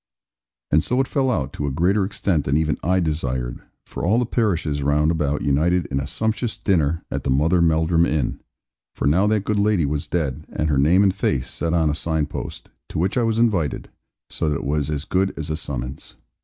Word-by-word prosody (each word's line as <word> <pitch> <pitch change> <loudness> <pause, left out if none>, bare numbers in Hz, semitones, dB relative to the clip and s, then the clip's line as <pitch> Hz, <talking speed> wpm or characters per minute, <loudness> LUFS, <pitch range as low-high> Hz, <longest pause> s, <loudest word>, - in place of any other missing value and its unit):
And 75 +2 +4
so 125 +6 0
it 135 - +2
fell 135 -3 +1
out, 70 - -1
to 70 - -3
a - - -1
greater 90 +8 +2
extent 95 -5 0
than 70 +2 +2
even 80 -2 +1
I 90 +2 +2
desired; 65 -7 -2 0.2
for - - -7
all 100 +7 +3
the 125 - +2
parishes 85 -11 0
round 75 +3 +2
about 75 -3 -1
united 80 +5 +2
in 70 - 0
a 70 - -3
sumptuous 110 - -2
dinner, 85 -4 +1
at - - -3
the - - -2
Mother 80 +7 +3
Melldrum 80 +1 +3
inn 75 -5 -1 0.6
for - - -3
now 85 +8 +3
that 105 -2 +1
good 105 -1 0
lady 100 -6 +2
was 75 +1 -2
dead, 75 -3 -2
and 75 - -1
her 70 -2 +2
name 85 +8 +4
and 95 -2 +3
face 70 -9 -1
set 85 0 -1
on 80 -3 +2
a - - -1
sign 80 -1 -1
post - - -7 0.2
to - - -5
which 90 +5 0
I 125 - +2
was 115 -1 +1
invited, 100 -10 0 0.4
so 80 - -2
that 75 - 0
it - - -4
was 75 +1 0
as 75 -1 -3
good 95 +1 0
as 80 -1 -4
a - - 0
summons. 65 -4 -5
80 Hz, 220 wpm, -22 LUFS, 75-95 Hz, 0.6 s, And